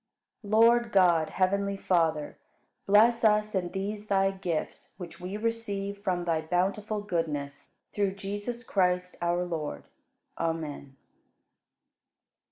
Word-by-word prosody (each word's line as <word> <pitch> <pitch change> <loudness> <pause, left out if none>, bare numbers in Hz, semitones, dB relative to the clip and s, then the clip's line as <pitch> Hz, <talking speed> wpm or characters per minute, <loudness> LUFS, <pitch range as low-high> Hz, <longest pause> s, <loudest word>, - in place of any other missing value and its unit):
45. 205 -2 -9
Lord 235 +1 +5
God, 175 -5 +4
heavenly 200 +1 0
Father, 165 -6 0 0.5
bless 225 +4 +5
us 215 -1 +3
and 180 -3 -1
these 205 +2 -4
Thy 195 -1 +2
gifts 180 -5 -4
which 175 -3 -9
we 185 +3 -5
receive 205 -3 -3
from 180 -3 -1
Thy 165 -2 +1
bountiful 195 +6 -1
goodness, 155 -7 -3 0.2
through 200 -2 0
Jesus 205 +5 -5
Christ, 180 -4 0
our 175 +1 0
Lord. 160 -4 -4 0.6
Amen. 155 -4 -3
195 Hz, 115 wpm, -28 LUFS, 175-210 Hz, 0.6 s, Lord